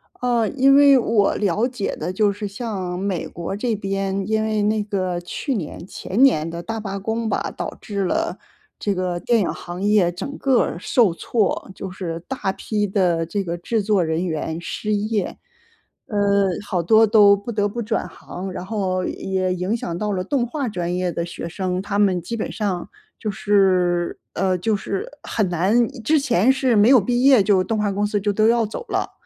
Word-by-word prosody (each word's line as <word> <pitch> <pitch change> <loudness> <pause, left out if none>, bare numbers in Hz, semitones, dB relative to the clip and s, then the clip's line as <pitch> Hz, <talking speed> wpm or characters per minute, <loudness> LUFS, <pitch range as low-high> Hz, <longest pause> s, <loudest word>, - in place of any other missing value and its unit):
呃， 240 -3 +1
因 275 0 +4
为 280 -1 +7
我 225 -4 +2
了 210 +3 +1
解 245 -6 -3
的 175 +4 -4
就 205 +1 +2
是 205 +1 -6
像 195 -4 -4
美 190 -3 -2
国 170 +3 -5
这 230 +2 -1
边， 195 -1 -2
因 220 0 +1
为 215 -1 0
那 210 0 +1
个 185 -4 -2
去 260 - -3
年 170 -2 -5
前 200 +6 -3
年 165 - +4
的 170 +1 -5
大 225 +4 -4
罢 200 -2 -4
工 225 +2 -2
吧， - - -2
导 - - -4
致 200 -3 -3
了 180 - -1 0.4
这 205 - -1
个 180 -1 -2
电 235 -1 +2
影 195 - +1
行 175 +1 -7
业 205 -4 +3
整 275 +11 -6
个 265 -3 +3
儿 - - -2
受 200 0 +2
挫。 200 0 -1
就 195 - -6
是 170 -3 -5
大 255 -8 -2
批 210 +1 -2
的 180 -4 +1
这 200 +4 -2
个 170 0 -3
制 215 +5 -1
作 200 -3 +2
人 160 +2 -1
员 160 -1 -3
失 210 +4 -3
业。 210 -1 -1 0.7
呃。 210 - -3 0.5
好 180 -5 -1
多 220 +4 +5
都 205 -2 +6
不 200 +4 -9
得 205 -1 0
不 235 +3 -4
转 220 +1 -2
行， 185 +1 -8
然 180 0 -6
后 190 -4 -1
也 185 -1 -1
影 185 +6 -1
响 170 -5 -4
到 210 +1 -2
了 185 -2 -1
动 245 +2 0
画 280 0 -3
专 175 -3 -3
业 180 -1 -1
的 170 - -2
学 170 -1 -6
生。 185 +1 -2
他 200 0 -3
们 185 -4 +3
基 230 - -5
本 - - -3
上， 195 -5 -3 0.3
就 215 - -2
是 185 -4 +2
呃， 185 0 +1
就 215 +5 0
是 195 -1 -4
很 215 -3 0
难 195 +8 +2 0.2
之 305 +7 +3
前 255 -3 +3
是 260 -3 +1
没 210 +3 +5
有 260 -3 +8
毕 245 +4 0
业 270 -5 +7
就 190 -2 +3
动 215 +3 -2
画 210 -1 +1
公 205 +1 0
司 205 0 0
就 205 0 0
都 215 +2 +3
要 235 -1 +3
走 210 - -6
了。 - - -1
200 Hz, 215 characters per minute, -22 LUFS, 185-220 Hz, 0.7 s, 有